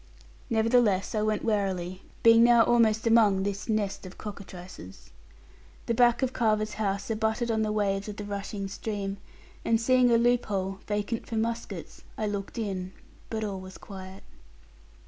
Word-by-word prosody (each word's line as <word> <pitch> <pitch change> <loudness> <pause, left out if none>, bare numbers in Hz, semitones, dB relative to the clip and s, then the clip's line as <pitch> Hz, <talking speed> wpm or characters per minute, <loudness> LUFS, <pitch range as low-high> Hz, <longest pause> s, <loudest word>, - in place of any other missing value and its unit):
Nevertheless, 225 -3 +2
I 215 - 0
went 215 0 0
warily, 190 -4 -1 0.2
being 230 0 +7
now 235 -1 +7
almost 225 -2 +3
among 215 -4 +4
this 200 +2 -3
nest 210 -3 -1
of 185 -1 -10
cockatrices. 185 - -10 0.7
The 235 - 0
back 240 +2 +4
of 260 0 0
Carver's 215 -3 +1
house 200 +1 -1
abutted 220 +2 0
on 220 -1 +1
the 215 -1 0
waves 205 -1 0
of 205 - -6
the 210 - -5
rushing 200 0 -4
stream; 200 -1 -4 0.5
and 225 -1 +2
seeing 255 +1 +4
a 235 - +5
loop 240 +1 +3
hole, 195 -1 -2
vacant 210 +2 -2
for 230 - -4
muskets, 225 -5 -4
I 215 - -1
looked 200 0 -4
in, 190 -4 -3 0.4
but 220 -1 -3
all 200 -2 -3
was 185 0 -10
quiet. 190 -1 -10
210 Hz, 160 wpm, -28 LUFS, 195-230 Hz, 0.7 s, being